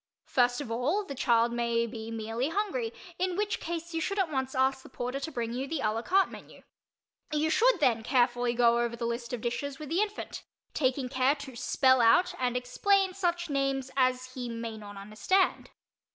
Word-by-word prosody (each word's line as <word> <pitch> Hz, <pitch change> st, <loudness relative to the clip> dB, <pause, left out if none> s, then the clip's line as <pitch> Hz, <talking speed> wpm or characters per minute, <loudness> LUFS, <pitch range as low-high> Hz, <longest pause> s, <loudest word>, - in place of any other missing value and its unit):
First 245 Hz, +1 st, +2 dB
of 245 Hz, -5 st, -6 dB
all, 295 Hz, -, 0 dB
the 280 Hz, -, -6 dB
child 235 Hz, -3 st, +2 dB
may 235 Hz, -1 st, +1 dB
be 225 Hz, -1 st, -7 dB
merely 225 Hz, +4 st, -2 dB
hungry, 425 Hz, +5 st, -1 dB, 0.3 s
in 365 Hz, -1 st, 0 dB
which 415 Hz, 0 st, -1 dB
case 335 Hz, 0 st, -5 dB
you 325 Hz, -, -1 dB
should 395 Hz, +5 st, -2 dB
at 375 Hz, -5 st, +1 dB
once 265 Hz, -1 st, -2 dB
ask 265 Hz, +1 st, +2 dB
the -, -, -14 dB
porter 250 Hz, +3 st, -4 dB
to 300 Hz, +3 st, -5 dB
bring 235 Hz, -4 st, -3 dB
you 260 Hz, +3 st, -3 dB
the 315 Hz, -1 st, -2 dB
a 215 Hz, -, +1 dB
la 225 Hz, +1 st, -2 dB
carte 380 Hz, +9 st, +2 dB
menu. -, -, -12 dB, 0.7 s
You 305 Hz, +1 st, +1 dB
should -, -, +4 dB
then 240 Hz, -7 st, +3 dB
carefully 245 Hz, 0 st, +1 dB
go 235 Hz, 0 st, +4 dB
over 235 Hz, 0 st, -1 dB
the 235 Hz, 0 st, -4 dB
list 235 Hz, 0 st, -3 dB
of 245 Hz, -3 st, -4 dB
dishes 270 Hz, +4 st, -3 dB
with 300 Hz, -1 st, -8 dB
the 345 Hz, +5 st, +1 dB
infant, 425 Hz, 0 st, -4 dB, 0.3 s
taking 260 Hz, -2 st, 0 dB
care 260 Hz, +2 st, +2 dB
to 280 Hz, -3 st, -9 dB
spell 260 Hz, +1 st, +3 dB
out 355 Hz, +11 st, +5 dB
and 250 Hz, -1 st, 0 dB
explain 380 Hz, +10 st, +2 dB
such 350 Hz, -3 st, -1 dB
names 275 Hz, -1 st, -1 dB
as 255 Hz, -1 st, +1 dB
he 250 Hz, -2 st, -5 dB
may 230 Hz, -1 st, -5 dB
not 205 Hz, -2 st, -10 dB
understand. 215 Hz, -, 0 dB
260 Hz, 200 wpm, -29 LUFS, 235-325 Hz, 0.7 s, out